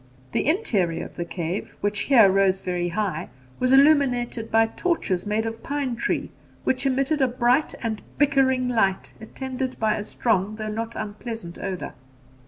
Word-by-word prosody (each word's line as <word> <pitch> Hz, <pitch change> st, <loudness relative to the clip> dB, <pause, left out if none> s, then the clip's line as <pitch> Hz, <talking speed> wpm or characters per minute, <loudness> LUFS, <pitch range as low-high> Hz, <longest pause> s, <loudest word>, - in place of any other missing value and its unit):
The -, -, 0 dB
interior 215 Hz, -, +1 dB
of -, -, -12 dB
the 170 Hz, -, -3 dB
cave, 170 Hz, +2 st, -4 dB
which 205 Hz, 0 st, 0 dB
here 235 Hz, -5 st, +6 dB
rose 195 Hz, 0 st, +3 dB
very 180 Hz, -2 st, -2 dB
high, 195 Hz, +2 st, -2 dB, 0.3 s
was 255 Hz, 0 st, +2 dB
illuminated 265 Hz, -5 st, +4 dB
by 225 Hz, 0 st, +4 dB
torches 225 Hz, -, -1 dB
made 215 Hz, +2 st, 0 dB
of 225 Hz, 0 st, -5 dB
pine 280 Hz, -3 st, -2 dB
tree, -, -, -2 dB, 0.3 s
which 260 Hz, +1 st, +1 dB
emitted 275 Hz, +3 st, +1 dB
a 265 Hz, -, +5 dB
bright 250 Hz, +3 st, +1 dB
and 220 Hz, -2 st, -2 dB, 0.2 s
bickering 265 Hz, -3 st, +3 dB
light, 195 Hz, -6 st, +1 dB
attended 260 Hz, +3 st, -5 dB
by 220 Hz, -1 st, +2 dB
a 205 Hz, -, -3 dB
strong 210 Hz, -2 st, 0 dB
though 215 Hz, 0 st, -4 dB
not 225 Hz, +2 st, -4 dB
unpleasant 215 Hz, -3 st, -6 dB
odour. 190 Hz, -2 st, -4 dB
225 Hz, 160 wpm, -24 LUFS, 200-260 Hz, 0.3 s, here